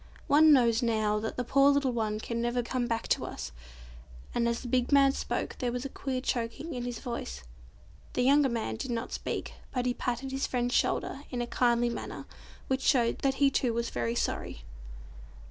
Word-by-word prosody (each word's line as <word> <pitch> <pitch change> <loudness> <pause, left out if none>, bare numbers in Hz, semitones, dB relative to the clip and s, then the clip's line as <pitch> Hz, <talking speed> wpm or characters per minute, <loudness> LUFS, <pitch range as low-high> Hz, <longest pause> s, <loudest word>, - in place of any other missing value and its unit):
One 310 +2 +6
knows, 235 -4 +5
now, 215 -3 +1
that 220 +1 -4
the 250 - 0
poor 275 +3 +4
little 280 -2 +2
one 215 -3 -1
can 235 +1 -3
never 240 +1 0
come 245 0 -1
back 230 -1 -2
to - - +2
us," - - -6 0.8
and 235 -1 +1
as 235 - -2
the 250 - -7
big 250 +2 +1
man 275 -1 +6
spoke - - -3
there 245 -2 0
was 250 +2 -4
a - - -3
queer 260 -1 -3
choking 250 +6 -3
in 245 -1 -4
his 245 -1 -4
voice. 70 - -5 0.7
The - - +1
younger 280 +1 +5
man 220 - -2
did - - -5
not 235 0 -3
speak, - - -4 0.2
but 250 -2 -1
he 250 - +1
patted 245 +2 -3
his 270 +1 -1
friend's 245 -1 -1
shoulder 275 - 0
in 250 - -4
a 240 - 0
kindly 240 0 +2
manner, - - -6 0.4
which 265 0 0
showed 240 -5 +2
that 270 -1 +1
he 275 0 +4
too 245 -4 +1
was 235 0 -1
very 120 -1 -1
sorry. - - -2
245 Hz, 200 wpm, -29 LUFS, 230-265 Hz, 0.8 s, One